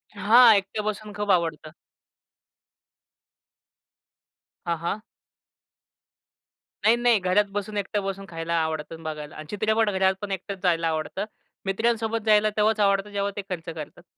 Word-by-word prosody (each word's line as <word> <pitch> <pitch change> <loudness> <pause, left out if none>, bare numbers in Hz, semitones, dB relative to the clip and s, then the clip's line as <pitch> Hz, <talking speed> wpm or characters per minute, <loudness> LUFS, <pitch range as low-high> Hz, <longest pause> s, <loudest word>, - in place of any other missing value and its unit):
हां. 225 +3 +7
एकट्या 200 +2 -1
बसून 215 0 -4
खूप 205 -1 0
आवडतं. 165 -3 0 3.0
हां, 170 - 0
हां. 170 +6 -3 1.8
नाही, 225 +2 +6
नाही. 240 -2 +3
घरात 185 +3 +2
बसून 205 +1 -4
एकटं 205 0 -2
बसून 195 0 -4
खायला 165 0 -4
आवडतं, 160 +1 -3
बघायला. 150 -1 -6
आणि 155 - -8
चित्रपट 220 +1 +1
घरात 190 -1 +2
पण 205 -1 -5
एकटच 195 0 -5
जायला 165 -2 +2
आवडत. 160 +3 -3 0.5
मित्रांसोबत 225 +2 0
जायला 215 0 +5
तेव्हाच 215 +1 +2
आवडतं 200 0 +2
जेव्हा 200 0 -1
ते 205 - -3
खर्च 170 -3 -4
करतात. 160 +2 -9
200 Hz, 130 wpm, -25 LUFS, 170-215 Hz, 3.0 s, हां